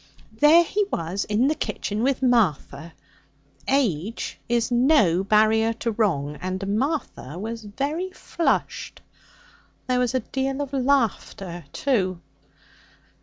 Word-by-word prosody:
There 300 +9 +6
he 410 +5 0
was 170 +5 -2
in 215 +5 +2
the 300 - +2
kitchen 215 -8 -3
with 265 +1 0
Martha! 170 - +1 0.7
Age 225 - -1
is 235 0 +1
no 240 - +4
barrier 220 +2 +3
to 230 +1 -3
wrong, 155 -10 0
and 190 +2 -2
Martha 270 - -3
was 225 +3 -5
very 290 - -3
flushed. 345 -2 -2 0.9
There 255 -1 +1
was 250 +1 0
a 255 - +1
deal 270 +3 -3
of 285 -1 -4
laughter, 230 - -1
too.' 185 - 0
230 Hz, 120 wpm, -24 LUFS, 190-270 Hz, 0.9 s, There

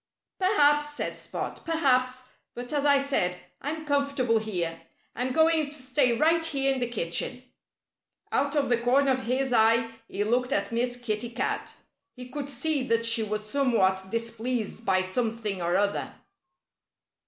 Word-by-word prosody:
"Perhaps!" 295 -6 +3
said - - -3
Spot. - - -6
"Perhaps! 255 -6 +1 0.3
But 245 +3 -7
as 290 -1 0
I 285 -1 +6
said, 265 -11 0 0.2
I'm 310 +3 -4
comfortable 280 -5 +1
here. 175 -6 -3 0.3
I'm 250 +2 -1
going 315 +1 +3
to 295 - -11
stay 255 -3 +1
right 325 +3 +3
here 275 -4 +1
in 265 - -3
the 245 -1 -1
kitchen." 240 +4 -2 0.9
Out 280 +2 0
of 280 -3 +1
the 240 -1 +2
corner 270 +3 +3
of 260 -2 -1
his 255 +2 0
eye 230 0 +4 0.2
he 205 - -2
looked 250 +4 0
at - - -1
Miss 245 +1 -1
Kitty 230 -1 -3
Cat. 235 - -3 0.4
He 250 0 -9
could 285 +1 -5
see 300 0 0
that 230 0 +2
she 230 0 +4
was 215 0 -3
somewhat 190 -8 +1
displeased 230 0 -3
by 185 0 +3
something 215 -1 -2
or 175 +1 0
other. 200 +1 0
250 Hz, 155 wpm, -27 LUFS, 225-280 Hz, 0.9 s, I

